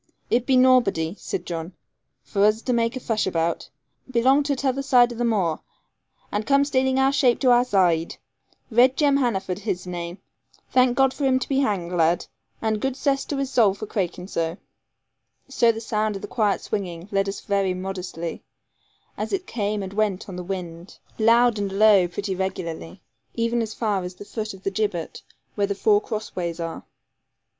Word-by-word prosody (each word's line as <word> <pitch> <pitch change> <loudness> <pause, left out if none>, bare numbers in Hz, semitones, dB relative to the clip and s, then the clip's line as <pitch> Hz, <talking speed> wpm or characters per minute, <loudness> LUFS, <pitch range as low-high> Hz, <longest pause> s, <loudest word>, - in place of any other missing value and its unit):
'It 245 +1 +2
be 265 - +4
nawbody,' 220 -10 +3
said 175 - -4
John, 170 +1 -5 0.5
'vor 200 -1 +2
us 215 +2 +2
to 250 - 0
make 230 +1 +1
a - - -3
fush 225 -4 -1
about. 170 -2 -1 0.4
Belong 260 +3 +4
to 285 -1 0
t'other 270 0 -1
zide 245 -3 +4
o' - - -10
the 240 - -2
moor, 195 -9 +1 0.7
and 205 +1 -1
come 280 0 +4
staling 265 -2 +1
shape 270 -4 +3
to 255 - +5
our 245 0 +5
zide. 180 -8 +1 0.5
Red 250 +3 +4
Jem 285 -2 +3
Hannaford 195 -8 -1
his 185 -2 -3
name. 175 0 -5 0.5
Thank 255 -1 +3
God 270 -1 +4
for 290 - -5
him 260 -1 +3
to 260 - -3
be 270 -1 +1
hanged, 195 -9 -1
lad; 170 -1 +2 0.4
and 220 -1 0
good 265 -1 -1
cess 275 -2 0
to 285 - -3
his 275 -1 -2
soul 215 -7 +4
for 215 - -6
craikin' 180 -3 -3
zo.' 165 -2 -2 0.9
So 240 -4 +3
the 225 - -6
sound 215 -1 -1
of 195 - -7
the - - -4
quiet 210 -4 0
swinging 180 -4 -4
led 195 0 +1
us 195 - -5
very 195 -2 0
modestly, 180 -3 -5 0.8
as - - -3
it 380 -2 -2
came 210 -2 -2
and 190 0 -7
went 205 -2 -1
on 190 - -7
the 180 - -5
wind, 175 -2 -6 0.2
loud 230 0 +4
and 200 -1 -2
low 200 -2 +5
pretty 195 +3 -4
regularly, 180 - -5 0.3
even 230 0 0
as 220 -1 -4
far 210 -4 0
as 180 0 -6
the 205 - -11
foot 215 -1 -5
of 190 - -16
the 195 - -1
gibbet 195 -5 -2 0.3
where 205 -1 0
the 200 - -2
four 210 0 +3
cross 215 0 -5
ways 170 -2 -3
are. 165 -1 -5
210 Hz, 190 wpm, -24 LUFS, 185-245 Hz, 0.9 s, to